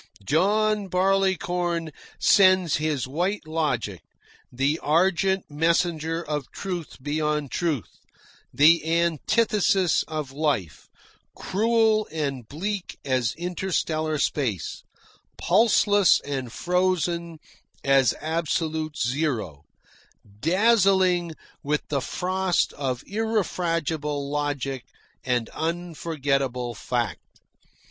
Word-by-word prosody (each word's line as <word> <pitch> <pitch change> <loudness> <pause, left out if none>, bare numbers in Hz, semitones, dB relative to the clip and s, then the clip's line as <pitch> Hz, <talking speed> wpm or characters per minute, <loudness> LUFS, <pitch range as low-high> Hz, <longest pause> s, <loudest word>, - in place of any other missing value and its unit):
John 205 - +2
Barleycorn 180 -3 0 0.3
sends 185 -4 +4
his 150 -4 -1
White 175 +6 -2
Logic, 130 - -2 0.5
the 135 +5 0
argent 190 +4 +2
messenger 165 +1 0
of 150 -3 -3
truth 180 -5 -5
beyond 150 -1 -1
truth, 155 - -2 0.5
the 160 +3 +5
antithesis 175 - +2
of 155 -4 -4
life, 135 - -2 0.5
cruel 220 +1 +2
and 140 -7 -3
bleak 190 - -4
as 130 -3 0
interstellar 170 -3 -2
space, 120 - -2 0.6
pulseless 205 -1 +4
and 135 -4 -4
frozen 175 0 0 0.5
as 135 -3 +4
absolute 160 -1 -2
zero, 120 - -2 0.7
dazzling 185 - +3 0.3
with 150 +1 -2
the 140 -2 0
frost 185 +5 0
of 130 -3 -3
irrefragable 165 -9 -1
logic 140 -3 -2 0.4
and 125 -3 0
unforgettable 145 -7 -2
fact. 120 -2 -4
160 Hz, 85 wpm, -25 LUFS, 140-185 Hz, 0.7 s, the